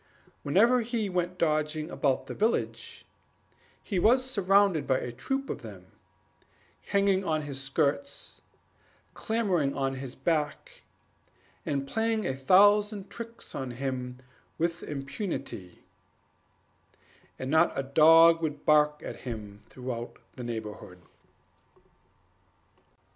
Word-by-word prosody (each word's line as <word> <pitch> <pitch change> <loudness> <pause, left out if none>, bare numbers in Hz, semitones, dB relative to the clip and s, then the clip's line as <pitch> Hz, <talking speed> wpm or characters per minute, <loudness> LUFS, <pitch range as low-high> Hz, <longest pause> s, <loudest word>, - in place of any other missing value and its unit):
Whenever 230 - +4
he 225 -3 -2
went 180 0 -2
dodging 155 -1 0
about 135 -3 0
the - - -6
village, 220 +3 -2 0.8
he 195 -5 -1
was 250 +7 +4
surrounded 200 - +3
by 130 - +3
a 125 - -4
troop 270 - -3
of - - -5
them - - -11 1.0
hanging 200 -1 +2
on 155 -4 -1
his 140 -2 -4
skirts, 145 - -2 0.7
clambering 190 -11 0
on 135 -1 -1
his 130 -1 -7
back, 155 -3 -2 0.9
and 140 -1 -1
playing 225 +3 0
a 135 - -1
thousand 205 +7 +4
tricks 230 0 -9
on 130 -1 -4
him 125 0 -4 0.4
with 170 +1 -1
impunity; 135 - -6 1.5
and 130 +1 -4
not 160 +2 +4
a 135 - 0
dog 165 +4 +6
would 150 -2 -3
bark 150 0 +4
at - - -6
him 105 -5 -7
throughout 125 -2 -6 0.2
the 125 - -7
neighborhood. 110 -6 -6
155 Hz, 110 wpm, -28 LUFS, 135-200 Hz, 1.5 s, dog